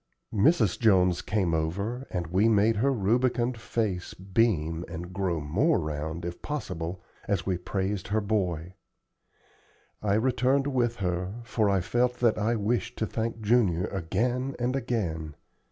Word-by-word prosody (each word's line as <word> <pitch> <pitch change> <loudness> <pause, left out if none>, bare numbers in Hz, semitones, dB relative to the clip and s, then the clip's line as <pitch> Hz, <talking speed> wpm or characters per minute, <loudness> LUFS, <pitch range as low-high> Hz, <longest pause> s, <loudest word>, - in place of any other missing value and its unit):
Mrs. 110 - +3
Jones 90 -5 +4
came 95 -4 0
over, 100 +11 -2
and 90 -2 -2
we 95 +7 +3
made 110 +1 +3
her 135 +6 +3
rubicund 120 +2 +1
face 105 -7 -2
beam 90 -5 0
and 85 +3 -7
grow 90 -3 -1
more 100 - +2
round, 80 +2 -4
if 85 0 -6
possible, 90 - -4 0.2
as 100 -4 0
we 95 -2 0
all 90 - -20
praised 95 0 -2
her 110 +2 +1
boy. 95 -5 -1 1.3
I 100 -1 +1
returned 130 +4 +2
with 125 -4 +1
her, 90 0 -2
for 110 -3 +1
I 100 -2 +2
felt 120 +6 +1
that 120 -3 +2
I 110 +3 +1
wished 115 +3 -1
to 110 - 0
thank 115 +1 -3
Junior 105 -6 +3
again 120 +9 -1
and 125 +2 0
again. 85 - -2
100 Hz, 150 wpm, -28 LUFS, 90-120 Hz, 1.3 s, Jones